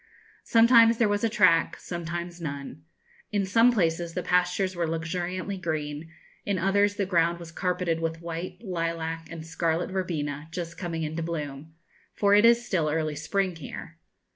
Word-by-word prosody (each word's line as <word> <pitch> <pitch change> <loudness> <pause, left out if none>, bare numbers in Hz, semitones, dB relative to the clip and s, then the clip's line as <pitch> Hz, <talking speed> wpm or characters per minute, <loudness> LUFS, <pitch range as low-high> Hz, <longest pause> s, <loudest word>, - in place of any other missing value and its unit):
Sometimes 230 0 +6
there 230 - +3
was 205 +1 0
a 230 - +3
track, 185 -7 +4
sometimes 175 0 -5
none. 140 -1 -6 0.5
In 205 -2 +1
some 230 +5 +5
places 170 -5 0
the 180 - -2
pastures 180 +1 +1
were 170 -1 -1
luxuriantly 175 +4 -3
green; 155 -2 -4 0.3
in 200 -2 -1
others 200 +3 +2
the 200 - 0
ground 170 -2 +2
was 170 -1 -10
carpeted 180 -2 -1
with 165 0 -2
white, 170 +2 -6
lilac, 165 -3 -3
and 165 -1 -7
scarlet 165 +2 -1
verbena, 155 -6 -3
just 170 0 -5
coming 170 -2 -4
into 160 +2 -3
bloom 155 -2 -5 0.4
for 200 -1 +3
it 210 +2 +6
is 235 0 +5
still 165 -9 0
early 155 -1 -1
spring 185 +4 -1
here. 165 +2 -9
170 Hz, 160 wpm, -27 LUFS, 165-190 Hz, 0.5 s, Sometimes